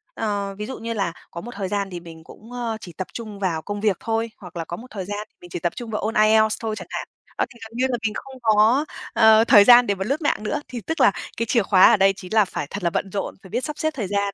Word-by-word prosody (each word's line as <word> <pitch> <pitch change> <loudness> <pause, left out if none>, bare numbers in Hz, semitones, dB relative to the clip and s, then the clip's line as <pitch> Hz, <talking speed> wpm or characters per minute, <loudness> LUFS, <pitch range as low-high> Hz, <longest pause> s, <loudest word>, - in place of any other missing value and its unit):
Ờ, 200 -2 -2
ví 210 - -4
dụ 260 - -6
như 230 0 -4
là 195 -6 -1 0.2
có 170 - -6
một 240 - -8
thời 195 -1 -3
gian 200 0 -2
thì 175 -2 -6
mình 165 -1 -12
cũng, 225 +8 -15
ơ, 240 -2 -3
chỉ 175 - -10
tập 190 - -5
trung 215 -4 -7
vào 170 -5 -1
công 205 +2 -5
việc 205 -4 +2
thôi, 225 0 -2
hoặc 180 -2 -12
là 165 -1 -4
có 170 - -6
một 245 +5 -11
thời 195 -3 -5
gian 205 +2 -5
thì - - -46
mình 175 - -12
chỉ - - -5
tập 175 0 -1
trung 240 -2 -7
vào 210 - -2
ôn 220 +2 -2
IELTS 215 0 +4
thôi 220 -1 -2
chẳng 180 -4 -8
hạn. - - -4 0.3
Đó - - +2
thì 240 -3 -17
gần 225 - -10
như 260 - +2
là 245 - 0
mình 215 - -4
không 270 -1 -8
có, 225 +6 +4 0.3
ờ, 220 0 +6
thời 205 -3 +8
gian 240 +2 +8
để 200 - +1
mà 190 - -3
lướt 275 +8 -1
mạng 290 -7 0
nữa. 215 - -2
Thì 250 -2 -6
tức 320 +8 -4
là - - +7 0.3
cái 230 - 0
chìa 230 -1 +2
khóa 190 -2 +6
ở - - +5
đây 195 0 +4
chính 185 +2 -9
là 215 -2 +5
phải 165 -5 -5
thật 200 -2 -6
là 170 - +3
bận 190 +3 -2
rộn, 200 - -3
phải 190 - -13
biết 245 +4 -2
sắp 300 -1 -5
xếp 315 - 0
thời 225 -9 -3
gian, 200 0 -1
210 Hz, 310 wpm, -23 LUFS, 195-230 Hz, 0.3 s, thời